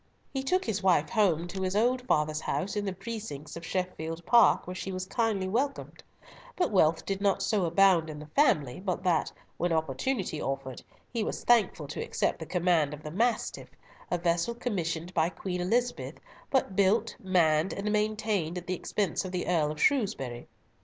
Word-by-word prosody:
He 270 - -1
took 365 +8 +1
his 210 -3 -1
wife 175 -6 +3
home 175 -7 +2
to 190 +2 -5
his 185 +1 -1
old 245 +4 +2
father's 155 -5 +1
house 195 +3 -2
in 205 -1 -1
the 195 - -1
precincts 190 -7 -7
of 170 - -8
Sheffield 165 -2 -3
Park, 235 +4 +5
where 180 - -5
she 190 +1 -5
was 185 0 -4
kindly 215 -3 0
welcomed; 270 +8 -2 0.5
but 360 - 0
wealth 165 -5 +3
did 195 0 -2
not 195 -1 +2
so 200 -3 +1
abound 170 -1 +4
in 155 - -6
the 150 - -8
family 155 - +2
but 185 -1 -3
that, 175 -4 +1 0.3
when 175 +1 0
opportunity 160 - -1
offered, 135 -2 -4 0.3
he 230 -3 0
was - - -4
thankful 215 -10 +3
to - - -4
accept - - -1
the 160 - -7
command 170 -5 +2
of 150 - -15
the 150 - -6
Mastiff, 230 +6 -1 0.4
a 175 - +1
vessel 170 +6 0
commissioned 180 -7 -3
by 165 -1 +2
Queen 180 +1 -4
Elizabeth, 240 +7 0 0.3
but 255 -8 +1
built, 205 +4 +2
manned, 170 -3 +2
and 205 +1 -2
maintained 210 -5 0
at 180 - -6
the 185 - -2
expense 185 0 -1
of 185 - -6
the 180 -1 -2
Earl 160 -4 +2
of 155 - -7
Shrewsbury. 135 - 0
185 Hz, 185 wpm, -29 LUFS, 160-210 Hz, 0.5 s, Park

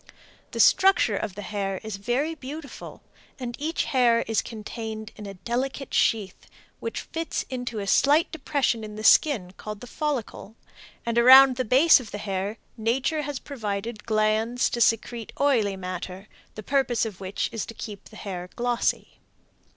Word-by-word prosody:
The - - -6
structure 380 - +5
of 195 - -4
the 205 - -7
hair 195 -2 -3
is 220 -2 -5
very 245 +10 -1
beautiful, 290 0 -9 0.3
and 245 -3 -5
each 320 +3 -1
hair 240 -3 +3
is 225 -1 +1
contained 220 0 -7
in 210 -1 -9
a 195 - -8
delicate 255 +7 -3
sheath 205 -5 0 0.3
which 460 - -4
fits 330 0 -4
into 245 -3 -4
a 200 - -3
slight 290 +10 +3
depression 280 -8 -1
in 210 -1 -8
the 215 - -7
skin 220 - +4
called 210 -1 -7
the 245 - -9
follicle, 245 -6 -4 0.5
and 235 0 +1
around 260 +2 +9
the 255 - -1
base 270 +9 +6
of 240 -5 -9
the 205 - -6
hair 200 +1 -3 0.2
nature 255 +7 0
has 290 -1 -4
provided 215 -4 -5
glands 220 +2 +1
to 235 - -2
secrete 225 0 +1
oily 225 -9 +2
matter, 185 +1 -6 0.3
the 215 - -7
purpose 245 -2 +1
of 205 -4 -7
which 190 +1 -2
is 225 - -3
to 230 - -9
keep 205 -3 -8
the 220 - -15
hair 180 -4 -6
glossy. 240 0 -1
230 Hz, 165 wpm, -25 LUFS, 210-265 Hz, 0.5 s, around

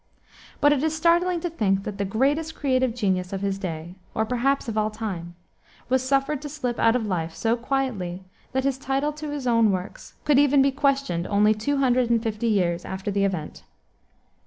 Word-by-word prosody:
But 290 0 +6
it 275 - 0
is 315 +1 0
startling 345 +2 +2
to 350 - -2
think 195 -9 +1
that 205 -1 -6
the 200 - 0
greatest 285 +10 0
creative 255 -4 +1
genius 185 -5 0
of 195 -1 -3
his 195 -1 -1
day, 170 -2 -5 0.2
or 220 - +1
perhaps 250 +4 0
of 225 - -3
all 215 0 +1
time, 190 -6 -5 0.5
was 260 0 +3
suffered 275 +2 0
to 295 - -6
slip 255 -5 -3
out 230 +1 +4
of 240 -3 0
life 165 -5 -2
so 225 +5 +1
quietly 235 -8 -2 0.3
that 265 0 0
his 270 -1 0
title 275 +2 0
to 300 0 -6
his 290 -3 -4
own 230 -3 +4
works 185 0 -5
could 290 -2 +5
even 285 -1 +5
be 275 - +3
questioned 275 - 0
only 210 +1 +4
two 250 +7 -1
hundred 255 -3 +2
and 230 -1 +2
fifty 225 0 -2
years 180 -5 +1
after 190 +2 -4
the 200 0 +1
event. 180 -6 -4
235 Hz, 200 wpm, -24 LUFS, 195-275 Hz, 0.5 s, But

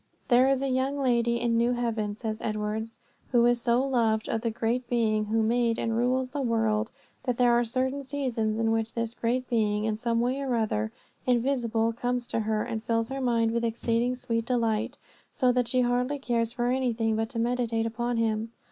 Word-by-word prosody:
"There 250 +1 +5
is 270 0 +1
a - - 0
young 265 +2 0
lady 235 -3 +1
in 235 -1 +1
New 235 +1 +2
haven," 225 -4 -2
says 220 0 -4
Edwards, 215 +1 -3 0.3
"who 240 -2 +4
is 240 0 +3
so 240 +1 +2
loved 225 -5 +1
of 225 - -1
that 230 -1 -1
Great 240 +2 -1
Being 220 -3 +1
who 220 +1 +1
made 230 0 +2
and 225 -1 -1
rules 255 +2 +1
the 285 0 -2
world, 225 -2 +1 0.4
that 250 -3 0
there 245 -1 +4
are 240 0 +4
certain 260 +4 -1
seasons 250 -6 -1
in 225 0 +1
which 225 0 -1
this 230 -1 -2
Great 245 +2 -1
Being 210 -2 +1
in 220 -1 0
some 230 +1 0
way 255 +3 0
or 260 -3 0
other 110 - 0 0.4
invisible 235 -3 +1
comes 245 +1 -2
to - - 0
her 215 -1 0
and 225 -2 -4
fills 230 0 0
her 270 0 -4
mind 230 -3 +2
with 235 0 -1
exceeding 235 +1 0
sweet 235 -2 -2
delight, 230 +1 0 0.3
so 255 -2 +2
that 245 -1 +1
she 255 0 +2
hardly 250 +3 +1
cares 235 -4 -1
for 240 0 -1
anything 235 -4 0
but 225 0 -1
to 235 - -7
meditate 230 -1 0
upon 240 +1 -2
Him. 225 0 0
235 Hz, 200 wpm, -27 LUFS, 225-250 Hz, 0.4 s, There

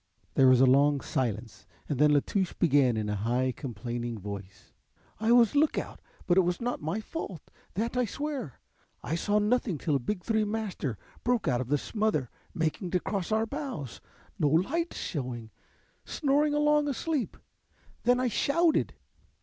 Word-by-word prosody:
There 135 - +5
was 130 -1 +6
a 135 - +7
long 140 +2 +4
silence 120 - -3 0.2
and 145 -4 -2
then 150 0 +6
La 145 -1 +5
Touche 190 -3 -1
began 140 -8 +3
in 110 -1 -1
a 105 - -1
high 120 +5 0
complaining 120 -2 -5
voice: 100 -1 -9 0.5
"I 220 +1 +2
was 240 -2 +6
lookout, 295 +1 +1 0.3
but 175 - +3
it - - +8
was 175 0 -1
not 245 +1 -2
my 160 +8 -2
fault, 215 - -7 0.2
that 230 +5 -1
I 250 0 +2
swear. 275 - -5 0.4
I - - -3
saw 205 +5 +1
nothing 210 -3 +1
till 145 +1 0
a - - +2
big 180 +9 -3
three 220 +1 +1
master 205 - -3 0.3
broke 245 -3 +1
out 125 -2 +2
of 125 - -4
the 145 +3 +2
smother 210 - -1 0.2
making 170 +4 -2
to 180 - +1
cross 195 +1 -3
our 220 +1 +2
bows, 255 - -6 0.4
no 150 - +3
lights 270 - +1
shewing, 125 -7 -4 0.5
snoring 290 +1 +1
along 295 0 +3
asleep. 285 0 -2 0.6
Then 245 +1 +3
I 255 - +1
shouted. 320 +7 +2
180 Hz, 165 wpm, -29 LUFS, -, 0.6 s, it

